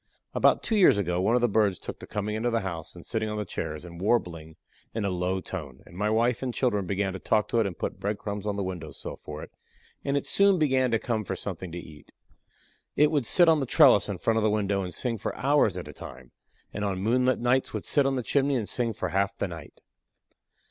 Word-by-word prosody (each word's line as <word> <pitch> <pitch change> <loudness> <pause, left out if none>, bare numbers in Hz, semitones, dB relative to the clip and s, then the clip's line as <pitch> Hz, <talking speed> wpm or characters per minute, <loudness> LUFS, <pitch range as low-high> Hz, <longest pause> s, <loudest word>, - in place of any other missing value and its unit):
About - - +3
two 225 - 0
years 190 - +6
ago 90 -2 0
one 115 +5 +2
of 125 - +2
the 120 - +4
birds 105 -3 +2
took - - -8
to - - -10
coming 105 0 -3
into 110 +3 0
the 115 -1 0
house, 85 -4 -6
and 85 - -12
sitting 110 -2 -2
on 105 - -3
the 105 - -2
chairs 80 -2 -5
and 85 0 -10
warbling 85 -7 -1 0.4
in 110 -3 -1
a 100 - 0
low 90 +1 -1
tone, 75 -9 -7
and - - -15
my 105 +3 0
wife 115 +2 +1
and 125 -2 -3
children 105 -7 0
began 95 0 -1
to 95 - -6
talk 105 +2 +1
to 115 - +2
it 110 - +2
and 90 - -7
put - - -4
bread 105 +1 -2
crumbs 105 0 -5
on 105 - -1
the 100 - -2
window 90 -4 -5
sill - - -8
for 75 0 -8
it, - - -11 0.5
and 140 0 0
it - - -2
soon 200 -1 +4
began 130 -5 +2
to 115 - +2
come 110 -1 -2
for - - -4
something 90 -2 -6
to 85 - -6
eat. 75 -3 -12 0.8
It 150 +1 +4
would 145 -7 0
sit 175 -2 +6
on 160 -2 +5
the 135 - -2
trellis - - +6
in - - -3
front 115 0 +1
of 110 - +1
the 110 - +3
window 100 -2 0
and 90 -1 -4
sing 115 +1 -2
for - - -4
hours 135 -9 +2
at 90 - -6
a 75 - -9
time, 65 -2 -11 0.4
and 105 - -3
on 100 -2 -1
moonlight 125 +6 +2
nights 125 +2 +1
would - - -5
sit 140 -2 +3
on 135 - 0
the 125 - -2
chimney 140 +4 +1
and 110 -5 -1
sing 120 -2 -1
for 110 - -3
half 100 0 0
the - - -1
night. 85 -4 -10
105 Hz, 255 wpm, -27 LUFS, 95-120 Hz, 0.8 s, years